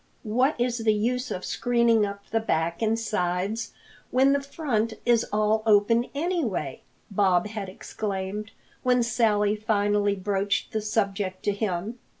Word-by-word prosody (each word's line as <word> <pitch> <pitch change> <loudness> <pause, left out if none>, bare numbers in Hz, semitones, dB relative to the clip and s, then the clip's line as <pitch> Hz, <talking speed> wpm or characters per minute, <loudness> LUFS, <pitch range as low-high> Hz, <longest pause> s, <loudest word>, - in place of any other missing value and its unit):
"What 250 +5 +1
is 240 0 0
the 220 -1 +2
use 250 +5 -1
of 185 - -4
screening 235 -3 +2
up 200 0 -7
the 225 - +2
back 170 -5 -1
and 225 0 +2
sides 200 0 -1 0.4
when 270 +2 +4
the 280 - +1
front 255 -6 -1
is 235 -1 +3
all 215 +1 +2
open 220 +3 +4
anyway?" 285 - -2 0.3
Bob 190 -2 +3
had 210 -2 -5
exclaimed 200 +1 -4 0.3
when 250 -1 +3
Sally 215 -3 +2
finally 205 -1 +1
broached 200 +1 -1
the 220 - -1
subject 200 -3 -1
to 205 - +2
him. 205 +2 -3
215 Hz, 145 wpm, -26 LUFS, 200-235 Hz, 0.4 s, when